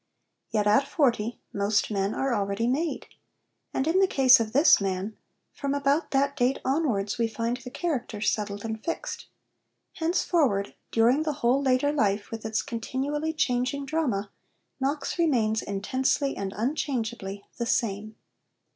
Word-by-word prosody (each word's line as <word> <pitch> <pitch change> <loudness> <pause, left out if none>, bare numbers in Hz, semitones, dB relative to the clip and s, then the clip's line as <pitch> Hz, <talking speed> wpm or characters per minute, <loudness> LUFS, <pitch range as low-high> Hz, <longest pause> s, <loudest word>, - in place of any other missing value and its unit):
Yet 210 -2 0
at 215 +7 +4
forty 240 -8 +1
most 205 +2 +1
men 200 0 0
are 270 -2 0
already 200 +1 -1
made. 295 +7 -1 0.7
And 265 - -1
in 330 +4 +3
the 385 - +5
case 265 -5 +6
of 220 -1 -2
this 285 -2 +6
man, 195 +2 -2 0.4
from 280 0 -2
about 285 +3 +1
that 280 +1 +1
date 255 0 +2
onwards 250 -8 0
we 230 - +2
find 230 +2 -2
the 255 0 -9
character 250 - -3
settled 205 -1 -1
and 220 -1 -4
fixed. 335 - -4 0.7
Henceforward, 320 - +1 0.2
during 235 +6 +3
the 310 -1 -1
whole 255 +4 +4
later 265 +1 +2
life 205 -7 0
with 225 -1 -5
its 220 - -1
continually 275 +6 -2
changing 270 -2 0
drama, 255 -10 -1 0.5
Knox 280 +5 -2
remains 230 -9 +2
intensely 260 +8 0
and 195 -1 -4
unchangeably 225 -6 -2
the 235 - -1
same. 215 -3 -1
245 Hz, 145 wpm, -27 LUFS, 215-280 Hz, 0.7 s, case